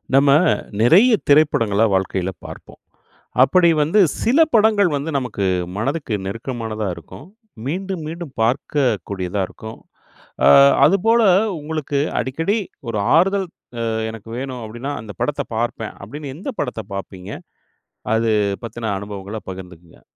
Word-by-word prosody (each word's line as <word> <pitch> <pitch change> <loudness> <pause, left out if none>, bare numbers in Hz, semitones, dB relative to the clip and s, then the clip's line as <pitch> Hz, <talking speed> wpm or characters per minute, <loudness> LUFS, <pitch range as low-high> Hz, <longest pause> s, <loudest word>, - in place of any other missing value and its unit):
நம்ம 140 +1 +5 0.5
நிறைய 185 - +6 0.2
திரைப்படங்கள 115 -8 +4
வாழ்க்கையில 95 -1 -1
பார்ப்போம். - - -11 0.6
அப்படி 175 +5 +4
வந்து, 165 +8 +2 0.2
சில 255 +7 +3
படங்கள் 210 -6 +4
வந்து, 145 +3 -4
நமக்கு 110 -6 -3 0.3
மனதுக்கு 135 +3 -2
நெருக்கமானதா 110 0 -4
இருக்கும். 85 - -12 0.4
மீண்டும், 185 +3 -3
மீண்டும் 165 -3 -7
பார்க்கக்கூடியதா 105 - -1
இருக்கும். 110 0 -10 0.7
அ - - +7 0.4
அதுபோல 220 +7 +3 0.4
உங்களுக்கு, 150 -2 -3 0.2
அடிக்கடி 165 - -1 0.3
ஒரு 110 - -2 0.2
ஆறுதல், 190 +3 +2 0.4
அ - - 0 0.2
எனக்கு 110 0 -11
வேணும், 130 -2 -5
அப்பிடின்னா, 120 +6 -5
அந்த 105 -1 -9
படத்த 145 -1 -1
பார்ப்பேன். 115 -1 -3
அப்பிடின்னு, 140 +6 -7
எந்த 200 - -5
படத்த 110 - -4
பாப்பீங்க? 95 -1 -7 0.8
அது 115 0 +1 0.3
பத்தின, 115 -1 -4
அனுபவங்கள 100 +1 -7
பகிர்ந்துக்கங்க. 90 -3 -12
130 Hz, 115 wpm, -20 LUFS, 105-160 Hz, 0.8 s, அ